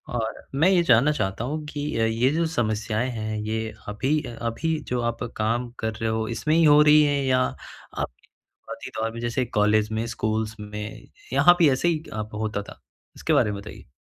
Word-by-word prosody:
और 110 -1 -3
मैं 160 +7 +4
ये 180 -3 +4
जानना 130 +2 +5
चाहता 100 -6 -2
हूँ 150 +4 -3
कि 145 -3 -3
अ, 115 - +2
ये 115 +4 +2
जो 165 +1 +1
समस्याएँ 110 -4 -1
हैं, 110 -2 -4
ये 110 +1 -3
अभी-अभी 130 +5 -1
जो 125 -1 -1
आप 120 0 -2
काम 120 +3 0
कर 110 0 -2
रहे 110 +1 -2
हो 110 0 -1
इसमें 150 +7 0
ही 165 - +5
हो 150 -1 +7
रही 150 0 +7
हैं 145 -1 +1
या 130 -1 +3
आप 130 - -5
के - - -28 0.2
शुरुआती - - -10
दौर 115 - 0
में 115 - -7
जैसे 120 +2 -1
कॉलेज 105 -1 +2
में, 110 +1 -1
स्कूल्स 110 0 -2
में 105 +1 -7 0.2
यहाँ 175 0 +6
भी 160 -5 +6
ऐसे 135 +7 +1
ही 160 -2 0
अ, 110 - -3
होता 105 -1 -2
था? - - -13 0.4
इसके - - -1
बारे 105 - +3
में 100 - -5
बताइए। 105 - -11
115 Hz, 200 wpm, -25 LUFS, 110-145 Hz, 0.4 s, हो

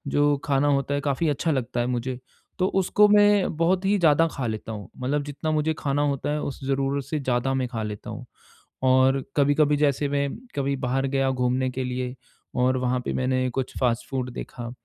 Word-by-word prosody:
जो 145 0 +3
खाना 140 0 +2
होता 140 -1 +1
है, 145 - 0
काफ़ी 145 +3 0
अच्छा 160 +3 0
लगता 125 -4 -2
है 120 - +1
मुझे, 125 +1 -2 0.4
तो 185 - +3
उसको 210 +3 +4
मैं 205 -4 +4
बहुत 180 +3 +2
ही 205 +1 +3
ज़्यादा 165 0 +4
खा 130 -3 -3
लेता 110 0 -4
हूँ। 105 -4 -7
मतलब 140 +3 -1
जितना 145 +2 -3
मुझे 155 +1 +1
खाना 145 0 0
होता 140 -1 -1
है, 150 0 -1
उस 140 -1 -5
ज़रूरत 135 0 0
से 155 - -2
ज़्यादा 130 0 0
मैं 130 -1 0
खा 115 -3 -4
लेता 105 -1 -6
हूँ। - - -7 0.6
और 130 +1 +4
कभी-कभी 145 +1 +3
जैसे 145 -1 +1
मैं, 140 0 0 0.3
कभी 140 0 0
बाहर 135 +2 0
गया 135 0 +1
घूमने 130 0 0
के 130 +1 -3
लिए 125 0 -3 0.4
और 130 +1 +2
वहाँ 125 0 0
पे - - -2
मैंने 130 0 0
कुछ 130 +1 -4
फ़ास्ट 120 -3 0
फ़ूड 130 -2 -2
देखा, 120 -1 -7
135 Hz, 200 wpm, -25 LUFS, 125-145 Hz, 0.6 s, उसको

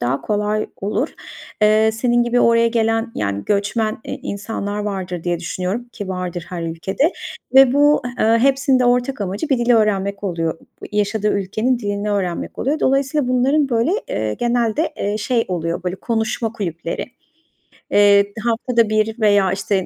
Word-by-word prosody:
daha 125 +3 -1
kolay 210 0 -1
olur. 200 +2 -2 0.5
Eee, 215 +1 +5
senin 240 +1 +2
gibi 240 +1 +1
oraya 230 0 +4
gelen, 225 0 0
yani, 100 0 -2
göçmen, 215 +2 0
eee, - - -5
insanlar 205 0 -4
vardır 190 -4 -4
diye 175 -1 0
düşünüyorum 185 +7 -4
ki 205 -4 -7
vardır, 180 -2 -4
her 175 -2 -5
ülkede 190 - -1 0.4
ve 265 -1 +7
bu, 290 0 +4 0.2
eee, 225 +1 +3
hepsinin 270 +1 +3
de 250 - +2
ortak 245 +1 +1
amacı, 200 +9 -3
bir 265 -3 +2
dil 240 +1 0
öğrenmek 200 -2 +1
oluyor, 165 -3 -2 0.3
yaşadığı 210 0 0
ülkenin 220 +6 0
dilini 205 -1 -2
öğrenmek 185 -4 -2
oluyor. 290 +4 -1
Dolayısıyla 275 0 +1
bunların 270 +3 +2
böyle, 235 +5 +1 0.2
eee, 110 -1 -2
genelde, 240 +6 0
eee, 205 +1 -1
şey 230 +2 0
oluyor, 170 -1 -2
böyle 180 +1 -3
konuşma 225 0 -2
kulüpleri. 170 -6 -4 0.9
Eee, 200 0 +5
haftada 235 -1 +1
bir 215 +2 0
veya 205 -3 +3
işte, 190 0 -1
215 Hz, 155 wpm, -19 LUFS, 190-240 Hz, 0.9 s, ve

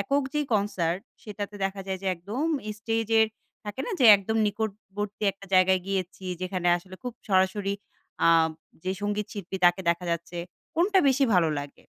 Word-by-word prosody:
একক 280 +8 +1
যেই 295 -1 0
কনসার্ট, 190 -4 0 0.2
সেটাতে 205 -1 -6
দেখা 195 0 -2
যায় 190 -1 -2
যে 195 - -4
একদম 205 - -4 0.3
স্টেজের, 225 0 +2 0.4
থাকে 210 +5 -5
না - - -3
যে 250 - +5
একদম 200 +3 -3
নিকটবর্তী 205 -1 -4
একটা 195 +1 -14
জায়গায় 185 0 +5
গিয়েছি। 190 -1 -3 0.2
যেখানে 185 -1 -2
আসলে 185 +2 -11
খুব 250 -1 -4 0.2
সরাসরি 195 +1 +2 0.5
আ - - +6 0.6
যে 185 - 0
সঙ্গীত 205 0 -1
শিল্পী, 195 -2 -5
তাকে 175 +2 +5
দেখা 170 +1 -2
যাচ্ছে। 170 +1 -3 0.4
কোনটা 380 +4 +3
বেশি 270 +1 +3
ভালো 170 -3 +4
লাগে? 145 0 -9
200 Hz, 160 wpm, -27 LUFS, 185-215 Hz, 0.6 s, আ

